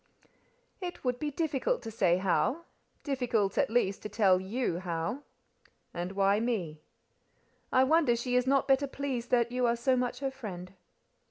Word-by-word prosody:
"It 360 -2 -6
would 250 -1 0
be 300 - -2
difficult 315 - -1
to 225 - -6
say 180 -5 +2
how—difficult, 245 - -1
at - - +2
least, 215 -4 +1
to 210 - -6
tell 195 -3 +3
you 195 -2 -2
how." 170 - -3 0.7
"And 175 +2 -4
why 195 +1 +3
me?" 185 -10 -2 0.9
"I 255 - +5
wonder 295 -3 +3
she 245 +1 -2
is 250 +1 +2
not 275 0 +2
better 275 +1 +3
pleased 265 -3 -4
that 240 -1 +2
you 250 0 +1
are 235 - +2
so 255 +2 +1
much 250 -1 -1
her 270 -1 -1
friend." 190 -8 -8
240 Hz, 160 wpm, -30 LUFS, 195-265 Hz, 0.9 s, I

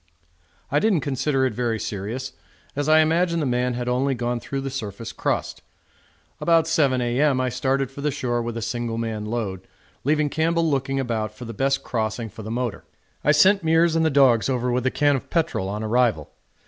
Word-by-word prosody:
I 145 - +3
didn't 200 -6 +2
consider 135 -1 0
it 130 - -1
very 115 -1 -1
serious, 110 +8 -4 0.4
as 145 +1 -1
I 155 0 +7
imagined 170 +2 +2
the 150 - 0
man 125 -1 0
had 120 0 -4
only 130 +2 +1
gone 120 0 -2
through 135 +3 -4
the 135 0 -4
surface 115 -3 -5
crust. - - -2 0.8
About 165 -1 +3
7 145 -5 +2
A.M. 130 +3 +2
I 130 0 +1
started 135 +1 -1
for 140 - -8
the 150 - +1
shore 125 -4 -1
with 115 0 -4
a 115 - -3
single 115 0 -3
man 110 -2 -3
load, 100 -5 -4 0.4
leaving 150 +1 +1
Campbell 165 +1 +1
looking 135 -2 0
about 110 -4 -2
for 125 - -9
the 115 - -6
best 135 +5 0
crossing 110 0 -2
for 110 - -10
the 110 - -7
motor. 120 -3 -3 0.4
I 150 - +4
sent 190 +6 +5
Meares 165 +1 +3
and 165 - +2
the 160 - +3
dogs 135 -5 +4
over 125 -1 0
with 125 +1 0
a - - +1
can 145 -1 +2
of 135 - -5
petrol 155 - 0
on 105 +2 -4
arrival. 110 -8 +1
130 Hz, 200 wpm, -23 LUFS, 115-145 Hz, 0.8 s, I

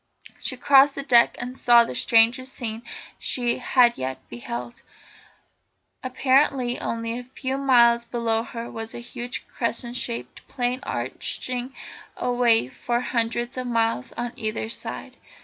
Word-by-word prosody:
She 255 - -4
crossed 275 +2 +5
the 275 - -4
deck, 240 -4 +5
and 250 +1 -5
saw 240 -2 +6
the 230 - -5
strangest 235 - +3
scene 225 -2 -4 0.4
she 240 -1 0
had 245 -1 +3
yet 130 0 -3
beheld. 120 0 -7 1.2
Apparently 260 -1 +2
only 230 +1 -3
a - - -8
few 260 +1 -4
miles 235 -3 +5
below 235 -2 -1
her 230 0 -7
was 225 0 -6
a - - -5
huge 240 +1 -6
crescent 235 0 -3
shaped 235 -2 -4
plain 250 0 -1
arching 255 -1 -4 0.4
away 245 - +2
for 240 - -2
hundreds 240 +1 -1
of 255 -1 -3
miles 225 - 0
on 240 0 -4
either 220 -1 -3
side. 230 - -6
240 Hz, 135 wpm, -24 LUFS, 230-255 Hz, 1.2 s, saw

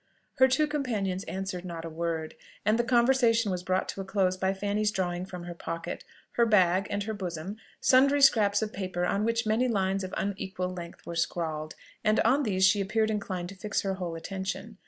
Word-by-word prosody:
Her 260 - +8
two 265 +4 +3
companions 220 -11 -2
answered 190 -1 -4
not 170 -2 -6
a - - -4
word, 160 -1 -3 0.3
and 215 +2 +3
the - - +3
conversation 235 -3 +3
was 180 -1 -2
brought 185 +1 0
to 195 - -4
a - - -4
close 190 -1 +1
by 190 +1 0
Fanny's 205 +2 0
drawing 185 -3 -2
from 180 -2 -7
her 175 0 -6
pocket, 170 0 -5 0.3
her 235 - +3
bag, 190 -2 +4
and 205 0 -1
her 220 +1 -3
bosom, 185 0 -5 0.2
sundry 275 +2 +5
scraps 210 -5 +5
of 215 - -4
paper, 185 -2 -2
on 200 +3 0
which 230 0 0
many 220 +4 +2
lines 195 -3 0
of 185 - -5
unequal 190 -2 -2
length 170 -1 -9
were 170 - -5
scrawled; 160 -2 -2 0.3
and 215 0 +3
on 260 +6 +3
these 190 -7 +2
she 200 +1 +4
appeared 220 +3 +1
inclined 190 -4 -3
to - - -8
her 190 - -19
fix 210 - 0
whole 185 -4 -3
attention. 195 +5 -5
195 Hz, 200 wpm, -28 LUFS, 180-220 Hz, 0.3 s, Her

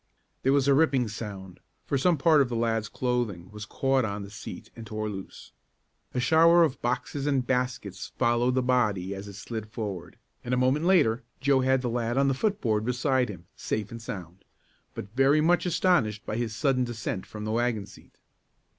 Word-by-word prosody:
There 135 - +2
was 140 -1 +3
a 140 - +6
ripping 135 -5 +3
sound, 100 -4 -7 0.3
for - - -1
some 165 +5 +3
part 155 +1 +5
of 130 - +1
the 120 - -3
lad's 115 -2 0
clothing 120 -8 -2
was 105 +1 -8
caught 135 -1 +1
on 100 -2 -3
the 100 - -10
seat 105 - -9
and 115 - -8
tore 110 0 -3
loose. 95 -2 -9 0.6
A - - +1
shower 165 +7 +6
of 145 -4 -1
boxes 130 +3 -2
and 135 -3 +1
baskets 125 -7 -2
followed 120 0 +2
the 130 - +2
body 105 -7 +1
as 100 +1 -7
it 100 - -9
slid 110 +2 -6
forward, 105 -6 -6 0.3
and 125 +1 -1
a - - -1
moment 130 +5 +2
later 155 -12 +4 0.2
Joe 140 0 +3
had 130 0 +2
the - - 0
lad 120 +1 -1
on 140 0 +3
the - - +2
foot 200 +9 -1
board 110 -3 +1
beside 125 +1 +1
him, 90 -4 -9
safe 105 -2 -3
and 115 0 -7
sound, 95 -4 -8 0.5
but 105 +3 -8
very 135 +3 +4
much 175 +4 +3
astonished 160 - +1
by 105 - -3
his 115 -2 -2
sudden 130 +2 +1
descent 110 -5 -4
from 105 0 -7
the 110 - -2
wagon 115 -3 0
seat. - - -17
120 Hz, 200 wpm, -27 LUFS, 105-135 Hz, 0.6 s, a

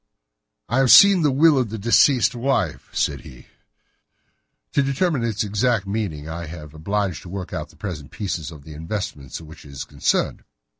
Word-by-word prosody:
"I 120 - +1
have 135 -2 +3
seen 200 +2 +8
the 150 - +3
will 145 +1 +4
of 125 -4 -1
the 110 - -5
deceased 120 +4 +4
wife," 120 - -1
said - - -1
he. 65 - -13 1.3
"To - - +2
determine 140 0 0
its 110 -1 -1
exact 105 +1 0
meaning 95 -8 -3
I 85 +1 -6
have 75 -2 -9
been 80 - -14
obliged 100 +3 -2
to 90 - -11
work 95 -1 -6
out - - -4
the - - -20
present 80 -9 -6
prices 95 -7 -4
of 75 -4 -12
the 75 - -11
investments 80 -4 -5
with 80 - -12
which 80 - -13
it - - -13
is 70 - -5
concerned. - - -1
100 Hz, 190 wpm, -22 LUFS, 80-125 Hz, 1.3 s, seen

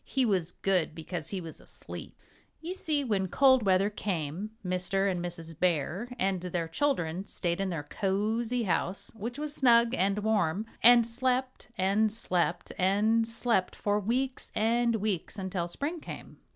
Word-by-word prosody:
He 265 -1 +1
was 185 -6 0
good 180 -5 0
because 165 0 -5
he 195 - -3
was 165 -3 -9
asleep! - - -9 0.4
You 340 +3 -5
see 305 -6 0
when 200 -6 0
cold 260 +5 +5
weather 195 0 +3
came, 185 -1 -3 0.2
Mr. 185 +2 +1
and 175 -1 -3
Mrs. 165 -2 -7
Bear 180 +5 0
and 190 -3 +1
their 175 -2 -2
children 185 - -1
stayed 175 +1 -1
in 195 - -1
their 165 -5 -3
cozy 220 +8 -1
house, 195 +1 -1
which 230 +4 -6
was 300 0 -3
snug 235 -3 +5
and 195 -4 +1
warm, 210 -3 +1 0.2
and 240 0 +8
slept 255 +2 -1
and 205 +3 +2
slept 180 -5 -1
and 215 +5 +3
slept 230 -4 0
for 205 0 0
weeks 255 +6 -2
and 235 +2 +2
weeks 210 -5 -2
until 185 -3 -2
spring 290 - -3
came. - - -9
200 Hz, 155 wpm, -29 LUFS, 180-235 Hz, 0.4 s, and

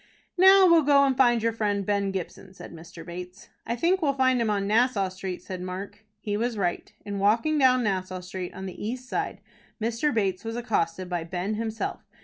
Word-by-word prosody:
"Now 380 +1 +7
we'll 335 -2 +6
go 285 -1 +5
and 270 -1 +1
find 240 -3 +3
your 230 0 +1
friend, 205 -3 -1
Ben 200 -1 0
Gibson," 190 0 -6
said - - -11
Mr. 165 0 -11
Bates. 180 +3 -9 0.2
"I 235 - -1
think 350 +10 +1
we'll 285 -3 +2
find 260 -2 +2
him 225 - 0
on 200 -1 0
Nassau 215 -2 +2
Street," 185 -1 -6
said 185 -2 -6
Mark. 185 +3 -7 0.2
He 205 -1 -3
was 230 +1 -1
right. 175 -3 -2
In 200 -1 -4
walking 230 +10 +2
down 255 -2 +4
Nassau 185 -3 -2
Street 180 0 -6
on 190 - -6
the 185 - -7
east 250 +4 -4
side, - - -3 0.4
Mr. 230 +6 0
Bates 195 -5 -1
was 225 0 -4
accosted 185 -7 -1
by 175 -2 -2
Ben 180 +4 -3
himself. 220 0 -3
210 Hz, 200 wpm, -26 LUFS, 185-245 Hz, 0.4 s, Now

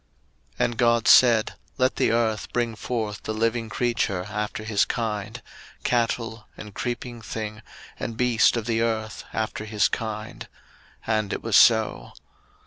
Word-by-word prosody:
01:001:024 - - +2
And 120 - -3
God 120 -1 +3
said, 115 -4 +6 0.2
Let 130 0 +2
the - - +2
earth 110 -3 0
bring 120 -2 0
forth 110 -2 -3
the 110 - -4
living 115 +1 0
creature 110 -7 -1
after 105 +2 -4
his 110 -2 +2
kind, 110 0 -3 0.4
cattle, 115 -2 -1
and 105 -1 -9
creeping 120 0 -4
thing, 110 -1 -6 0.4
and 115 - -4
beast 120 -1 +3
of 115 - -3
the 115 -1 0
earth 110 -2 -2
after 110 -1 -3
his 105 -2 +2
kind: 110 -2 -5 0.6
and 110 -2 0
it - - -4
was 115 -3 0
so. 110 - +4
110 Hz, 145 wpm, -25 LUFS, 110-120 Hz, 0.6 s, said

